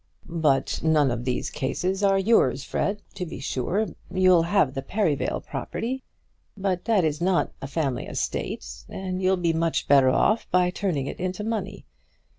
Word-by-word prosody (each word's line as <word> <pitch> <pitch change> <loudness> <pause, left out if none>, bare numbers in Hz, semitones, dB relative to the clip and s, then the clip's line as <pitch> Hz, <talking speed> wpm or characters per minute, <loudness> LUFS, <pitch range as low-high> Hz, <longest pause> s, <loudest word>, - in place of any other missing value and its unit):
"But 155 -6 +1
none 155 -4 +3
of 120 0 -3
these 125 -1 -1
cases 180 +8 -2
are 195 -1 +4
yours, 190 - +3
Fred. 205 +8 -2
To 195 - -4
be 170 - -6
sure 170 - -1 0.2
you'll 185 -1 +5
have 170 -5 +2
the 135 - -3
Perivale 160 -1 0
property; 260 +3 -4 0.6
but 190 -2 -1
that 215 -5 +3
is 155 +1 -1
not 180 0 +2
a 135 - -4
family 140 -2 -2
estate, - - -3 0.2
and 185 -1 -4
you'll 190 0 +3
be 170 -2 +1
much 165 0 0
better 135 -2 +6
off 215 - +2
by 180 0 +3
turning 180 -8 -1
it - - -6
into 185 +3 -3
money. 205 -3 -3
180 Hz, 165 wpm, -25 LUFS, 145-195 Hz, 0.6 s, better